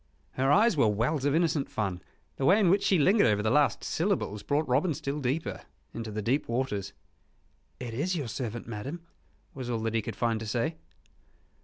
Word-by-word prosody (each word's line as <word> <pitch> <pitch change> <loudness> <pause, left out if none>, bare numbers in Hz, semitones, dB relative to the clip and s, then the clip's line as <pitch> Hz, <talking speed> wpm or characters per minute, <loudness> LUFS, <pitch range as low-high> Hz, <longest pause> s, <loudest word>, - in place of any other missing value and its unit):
Her 135 +2 +1
eyes 215 +4 +5
were 135 -7 +4
wells 120 +8 0
of 145 +1 +2
innocent 165 -4 +1
fun. 95 -5 -2 0.4
The 135 - -1
way 190 +8 +6
in 185 -5 +4
which 195 +1 +3
she 190 - +3
lingered 190 - +4
over 105 -1 +2
the 110 - +1
last 145 +3 +3
syllables 165 - -1
brought 150 +5 0
Robin 145 +6 +2
still 145 -1 -3
deeper 140 +5 -2 0.3
into 115 -1 -5
the 105 0 -4
deep 130 +7 0
waters. 105 -6 -2 0.9
"It 120 -2 -6
is 165 +10 -1
your 145 -7 -3
servant, 120 -1 -4
madame," 135 +10 -6 0.5
was 130 -2 -6
all 120 - 0
that 115 0 -1
he 115 - +1
could - - -6
find 115 -2 0
to 110 - -6
say. 140 +9 -1
130 Hz, 195 wpm, -29 LUFS, 115-155 Hz, 0.9 s, way